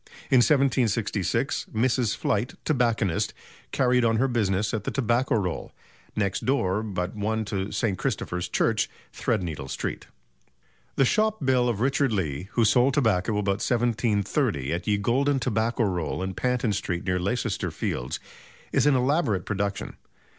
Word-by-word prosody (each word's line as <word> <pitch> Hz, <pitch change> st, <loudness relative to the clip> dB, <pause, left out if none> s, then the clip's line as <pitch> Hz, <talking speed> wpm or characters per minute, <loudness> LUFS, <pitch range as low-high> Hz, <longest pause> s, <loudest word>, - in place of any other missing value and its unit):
In 130 Hz, -, +6 dB
1766, 120 Hz, -, +1 dB
Mrs. 120 Hz, -1 st, +1 dB
Flight, 105 Hz, +5 st, -1 dB
tobacconist, 115 Hz, -, +1 dB, 0.4 s
carried 125 Hz, -1 st, +3 dB
on 115 Hz, -1 st, +3 dB
her 130 Hz, +4 st, +2 dB
business 105 Hz, -4 st, 0 dB
at 110 Hz, -3 st, -2 dB
the -, -, -2 dB
"Tobacco 125 Hz, 0 st, +1 dB
Roll. 90 Hz, -6 st, -2 dB, 0.4 s
Next 100 Hz, -2 st, -1 dB
door 105 Hz, -7 st, +1 dB
but 95 Hz, -4 st, -3 dB
one 110 Hz, +1 st, -1 dB
to 100 Hz, 0 st, -3 dB
St. 100 Hz, -7 st, -1 dB
Christopher's 90 Hz, 0 st, -2 dB
Church, -, -, +1 dB, 0.2 s
Threadneedle 85 Hz, -, -2 dB
Street." -, -, -4 dB, 0.9 s
The 135 Hz, -, +4 dB
shop 215 Hz, -, +1 dB
bill 125 Hz, -2 st, +3 dB
of 110 Hz, -3 st, -2 dB
Richard 135 Hz, 0 st, +2 dB
Lee, 90 Hz, -4 st, -2 dB
who 115 Hz, -, +3 dB
sold 125 Hz, +5 st, +4 dB
tobacco 110 Hz, -7 st, +2 dB
about 100 Hz, -1 st, 0 dB
1730 115 Hz, -, 0 dB
"at 85 Hz, -, -4 dB
Ye 105 Hz, -1 st, +3 dB
Golden 135 Hz, +7 st, +1 dB
Tobacco 115 Hz, -1 st, 0 dB
Roll 90 Hz, -4 st, -1 dB
in 95 Hz, 0 st, -3 dB
Panton 125 Hz, -1 st, 0 dB
Street 85 Hz, -3 st, -3 dB
near 90 Hz, -1 st, +1 dB
Leicester 100 Hz, +3 st, -1 dB
Fields," 60 Hz, -, -3 dB, 0.5 s
is -, -, +3 dB
an 145 Hz, -, +5 dB
elaborate 125 Hz, -, +1 dB
production. 100 Hz, -1 st, -3 dB
110 Hz, 145 wpm, -26 LUFS, 95-125 Hz, 0.9 s, In